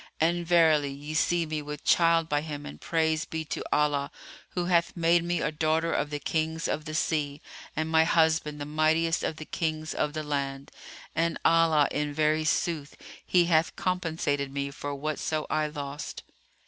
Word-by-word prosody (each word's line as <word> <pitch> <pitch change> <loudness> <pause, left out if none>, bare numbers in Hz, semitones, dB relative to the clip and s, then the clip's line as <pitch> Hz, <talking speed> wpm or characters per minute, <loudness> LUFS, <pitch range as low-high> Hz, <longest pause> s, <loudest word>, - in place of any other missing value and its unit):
And 170 +1 +1
verily, 160 -4 +4
ye 145 +2 -7
see 170 +2 +2
me 155 -1 -3
with 150 0 -7
child 165 -1 +4
by 145 -2 +1
him 150 -2 -6
and 75 +1 -9
praise 160 -1 +1
be 160 0 -5
to - - -4
Allah, 145 -1 +1 0.5
who 175 -1 0
hath 170 -1 +1
made 170 0 +3
me 175 0 -1
a 150 - 0
daughter 160 +2 +1
of 145 - 0
the 150 - -3
Kings 160 +2 -1
of 155 - -2
the 155 -1 -5
sea, 150 -3 -1 0.4
and 155 +1 -1
my 160 0 +4
husband 160 -2 +2
the 145 - -4
mightiest 155 +2 +2
of - - -1
the 155 - -8
Kings 155 -2 -2
of 150 - -1
the 155 -1 -3
land, 140 -1 -3 0.4
and 165 +1 +1
Allah, 165 -3 +5
in 150 0 -2
very 155 +1 +2
sooth, 155 -2 -1 0.3
he 175 -1 +3
hath 165 -1 +2
compensated 160 -6 -1
me 140 0 -3
for 145 0 -5
whatso 155 +1 -2
I 155 0 +1
lost." 145 -1 -6
155 Hz, 180 wpm, -28 LUFS, 150-165 Hz, 0.5 s, Allah